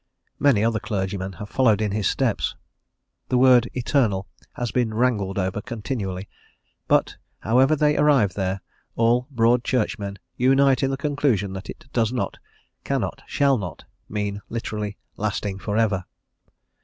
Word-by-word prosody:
Many 130 -8 +4
other 115 -1 +1
clergymen 95 -2 -3
have 100 +3 -8
followed 115 -3 +3
in 105 -2 0
his 105 -2 0
steps. - - 0 0.7
The 125 - +2
word 125 -2 +6
"eternal" 120 -7 +1 0.3
has 120 -3 -3
been 115 -2 0
wrangled 110 -5 +1
over 95 +2 -1
continually, 105 -5 -4 0.6
but, - - +2 0.2
however 130 +7 +4
they 150 0 +3
arrive 140 -10 +4
there, 95 0 -2 0.3
all 120 +2 +2
Broad 120 -2 +3
Churchmen 105 -5 -1 0.2
unite 135 +1 +4
in 135 - +2
the 135 - -2
conclusion 135 -10 0
that 95 +2 -7
it - - -9
does 115 -2 +2
not, 125 - -3 0.4
cannot, - - -2
shall 140 -3 +2
not, 90 -4 -6 0.3
mean 100 -1 -3
literally 105 -3 -4 0.2
lasting 100 -2 -2
for 105 +1 -2
ever. 100 -5 +1
110 Hz, 145 wpm, -24 LUFS, 100-125 Hz, 0.7 s, word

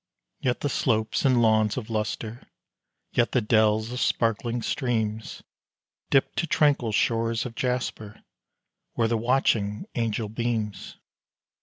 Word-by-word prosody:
Yet 125 -1 -1
the - - 0
slopes 110 -3 0
and 125 -3 +4
lawns 110 -1 +3
of 115 -3 -5
lustre, 110 +2 -3 0.6
yet 120 - +1
the 125 - +4
dells 110 0 +2
of 125 - -4
sparkling 115 0 0
streams, 110 -5 -2 0.7
Dip 135 - +3
to 170 - 0
tranquil 145 -7 +2
shores 115 +2 +1
of 120 - -6
jasper, 120 -4 -3 0.7
where 115 - +1
the 115 - 0
watching 110 -3 +1
angel 115 -2 -1
beams. 110 -2 -3
115 Hz, 125 wpm, -26 LUFS, 110-125 Hz, 0.7 s, and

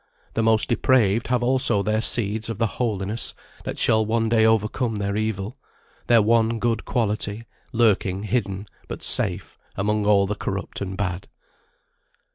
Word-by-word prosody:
The 115 - 0
most 110 -1 +2
depraved 115 -3 +2
have 125 -1 0
also 120 -5 +2
their 110 +1 0
Seed 110 -1 +2
of 115 - -4
the 115 - +1 0.2
Holiness 105 -1 -1 0.3
that - - -5
shall 110 0 +2
one 110 +1 0
day 110 -1 +4
overcome 110 +1 0
their 100 -1 -2
evil, 110 +3 -3 0.5
their 115 -3 +5
one 115 +1 +2
good 115 -1 -1
quality, 110 -1 -2 0.3
lurking 100 -4 +1
hidden, 100 -3 -2 0.2
but - - -7
safe, - - +2 0.2
among 105 +1 -1
all 100 -2 +4
the 100 - -2
corrupt 100 -1 -5
and 95 -1 -4
bad. 95 -1 -3
110 Hz, 150 wpm, -23 LUFS, 100-115 Hz, 0.5 s, their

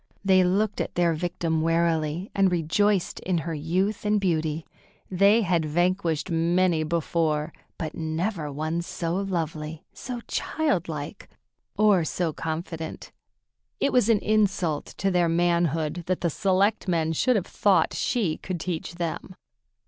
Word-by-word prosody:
They 190 -1 +5
looked 200 +4 +1
at - - -4
their 175 -1 +3
victim 165 -1 -1
warily, 165 +1 0
and 195 -2 +3
rejoiced 180 +4 +1
in 185 -2 -1
her 165 0 -3
youth 180 +7 -1
and 210 0 +2
beauty. 160 -4 -1 0.5
They 200 +5 +4
had 170 -3 +1
vanquished 170 0 0
many 170 0 +2
before, 155 -1 0 0.2
but 155 -3 -4
never 160 0 -2
one 155 +4 -2
so 170 -1 -3
lovely, 160 -5 -3
so 245 -2 -6
child 295 - -1
like, 150 +5 -6 0.5
or 205 -5 +4
so 165 0 -1
confident. 160 0 -5 0.7
It 280 - +1
was 245 -3 +4
an 225 - +5
insult 195 -8 +1
to 195 - 0
their 175 -2 +2
manhood 170 -1 +1
that 185 0 -1
the 170 - +1
selectmen 185 -3 +1
should 250 - +2
have 195 -4 0
thought 205 -2 +2
she 205 -11 0
could 185 -2 -5
teach 170 0 -4
them. 175 +2 -4
170 Hz, 140 wpm, -26 LUFS, 160-195 Hz, 0.7 s, They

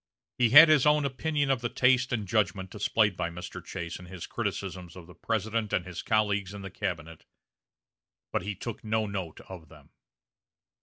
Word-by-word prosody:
He 120 -2 +4
had 150 +7 +10
his 150 -3 +4
own 150 -1 +4
opinion 145 +1 -1
of 130 -3 0
the 120 - -2
taste 130 +1 +2
and 110 -5 -2
judgment 95 -2 0
displayed 105 -1 +1
by 85 -2 -2
Mr. 90 +1 -8
Chase 85 -2 -6
in 90 - -11
his 90 -2 -8
criticisms 90 -3 -5
of 90 -2 -11
the 90 - -14
President 110 +4 -2
and 90 - 0
his 90 -2 -6
colleagues 105 -2 0
in 100 - -8
the 95 - -7
cabinet, 80 -5 -5 1.1
but - - +1
he 100 0 -4
took 115 +1 -7
no 110 0 0
note 95 -6 -5
of 85 -5 -11
them. - - -18
100 Hz, 185 wpm, -28 LUFS, 90-115 Hz, 1.1 s, had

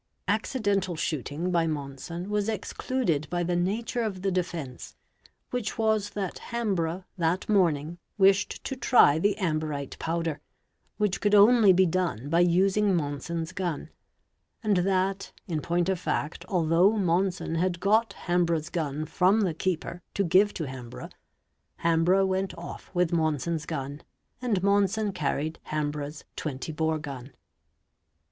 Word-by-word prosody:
Accidental 205 -3 0
shooting 155 +2 -2
by 170 -2 +2
Monson 155 +5 -5
was 210 0 0
excluded 205 - -1
by 175 0 -1
the 175 +1 0
nature 215 +7 -1
of 195 -5 -3
the 195 - +1
defence, 170 -8 -4 0.6
which 245 -4 -3
was 220 -2 +1
that 195 -3 -3
Hambrough, 190 -7 -1 0.2
that 170 +2 0
morning, 170 -5 +1 0.2
wished 195 0 +3
to 270 - -3
try 200 - +5
the 205 +3 +2
amberite 155 -7 -2
powder, 165 -2 -2 0.6
which 210 -3 0
could 205 0 +3
only 210 0 +7
be 185 +1 +5
done 165 - -1
by 165 +2 +3
using 190 +3 +3
Monson's 160 +2 -3
gun, 175 -5 -3 0.7
and 210 -3 +2
that, 190 +1 0 0.2
in 160 -4 -2
point 175 +2 0
of 190 -2 0
fact, 165 -1 -2
although 175 +2 +4
Monson 185 -3 0
had 175 +1 0
got 215 +2 +2
Hambrough's 170 -3 +1
gun 155 -3 -2
from 185 +6 +3
the 185 -5 +1
keeper 175 +1 -3
to 200 - +2
give 190 +4 +4
to 165 - -3
Hambrough, 130 -3 -8 0.7
Hambrough 170 +4 +4
went 190 -1 -1
off 170 - -8
with 175 -1 +2
Monson's 160 0 0
gun, 145 -1 -4 0.4
and 215 -7 0
Monson 200 +1 +2
carried 155 -2 -2
Ham 150 -1 -1
brough's 150 0 -6
20 145 0 -4
bore 160 0 0
gun. 140 -3 -8
175 Hz, 140 wpm, -27 LUFS, 160-195 Hz, 0.7 s, only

